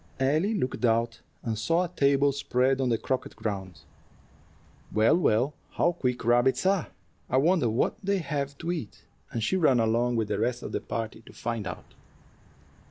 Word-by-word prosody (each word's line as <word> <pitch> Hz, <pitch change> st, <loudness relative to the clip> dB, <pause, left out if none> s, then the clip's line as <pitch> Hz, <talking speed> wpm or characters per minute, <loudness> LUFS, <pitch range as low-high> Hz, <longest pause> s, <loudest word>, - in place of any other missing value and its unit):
Ellie 155 Hz, +11 st, +2 dB
looked 130 Hz, -9 st, -2 dB
out, 115 Hz, 0 st, +1 dB, 0.2 s
and 110 Hz, -2 st, -2 dB
saw 165 Hz, +10 st, +2 dB
a -, -, -2 dB
table 140 Hz, -4 st, +3 dB
spread 130 Hz, -1 st, +1 dB
on 130 Hz, -, +1 dB
the 115 Hz, -, +2 dB
croquet 130 Hz, +3 st, -3 dB
ground. 95 Hz, -7 st, -5 dB, 1.1 s
"Well, 110 Hz, +6 st, +4 dB
well, 135 Hz, -4 st, +2 dB, 0.2 s
how 175 Hz, -, +2 dB
quick 125 Hz, -9 st, -2 dB
rabbits 120 Hz, +4 st, +3 dB
are! 190 Hz, -3 st, +2 dB, 0.4 s
I -, -, +2 dB
wonder 155 Hz, -3 st, +3 dB
what 110 Hz, -, 0 dB
they 200 Hz, +1 st, +1 dB
have 140 Hz, -4 st, -3 dB
to 170 Hz, +3 st, -3 dB
eat;" 155 Hz, -12 st, -6 dB, 0.3 s
and 115 Hz, -, -2 dB
she 185 Hz, -, +1 dB
ran 135 Hz, -8 st, +4 dB
along 115 Hz, +2 st, +2 dB
with 110 Hz, -2 st, 0 dB
the 105 Hz, -1 st, -1 dB
rest 120 Hz, +2 st, -1 dB
of -, -, -5 dB
the -, -, -2 dB
party 115 Hz, -1 st, -4 dB
to -, -, -13 dB
find 115 Hz, -4 st, -3 dB
out. 85 Hz, -, -8 dB
125 Hz, 175 wpm, -27 LUFS, 115-150 Hz, 1.1 s, Well